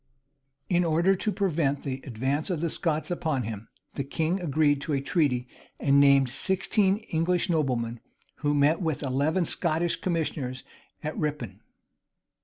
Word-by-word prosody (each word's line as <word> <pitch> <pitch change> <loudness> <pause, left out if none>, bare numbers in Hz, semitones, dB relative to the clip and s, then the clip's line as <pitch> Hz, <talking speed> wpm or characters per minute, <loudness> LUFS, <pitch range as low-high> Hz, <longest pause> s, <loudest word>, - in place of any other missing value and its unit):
In 175 -1 +2
order 170 +4 +3
to 210 +3 -1
prevent 165 -9 0
the 135 -1 -4
advance 135 - -1
of 175 -4 -1
the 165 0 -1
Scots 160 -1 -1
upon 155 -7 -1
him, 110 -1 -6 0.3
the 140 - -3
king 160 +6 -1
agreed 145 -3 +2
to 150 - -3
a 140 - +2
treaty, 135 -4 0 0.3
and 140 0 +4
named 140 -1 +6
sixteen 190 - +1
English 175 +3 +1
noblemen, 120 -7 0 0.4
who 145 0 0
met 145 +4 +3
with 160 -5 -1
eleven 145 +7 +1
Scottish 170 +1 0
commissioners 150 -7 -2 0.4
at 155 +1 -3
Rippon. 130 -10 -3
150 Hz, 145 wpm, -27 LUFS, 135-170 Hz, 0.4 s, named